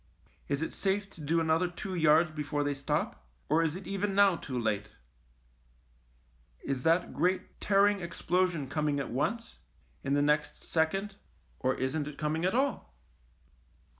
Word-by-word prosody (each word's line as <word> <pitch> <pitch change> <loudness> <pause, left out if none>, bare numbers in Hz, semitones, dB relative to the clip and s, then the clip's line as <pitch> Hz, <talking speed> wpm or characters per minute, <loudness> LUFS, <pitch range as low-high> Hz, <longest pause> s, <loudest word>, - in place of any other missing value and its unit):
Is 140 +2 -1
it - - -4
safe 195 0 -1
to 165 - -12
do 160 +3 +1
another 165 +2 +2
two 180 +2 -6
yards 160 -1 +4
before 150 -1 -2
they 145 0 0
stop, 135 - -2 0.3
or 155 +3 +4
is 160 -1 0
it 190 - -8
even 195 0 -2
now 200 -2 +6
too 130 -6 -5
late? 105 -3 -1 1.7
Is 135 -2 -2
that 165 +5 +2
great 185 +1 -1
tear 200 -1 +4
ing 205 -1 +2
explosion 175 -3 0
coming 150 0 0
at 140 - -4
once, - - -2 0.4
in 140 - +1
the 145 - +3
next 150 0 0
second, 195 +5 0 0.4
or 130 0 +1
isn't 140 +3 -1
it 150 -1 -8
coming 155 +3 -1
at 185 - +1
all 265 - -1
160 Hz, 160 wpm, -30 LUFS, 145-185 Hz, 1.7 s, now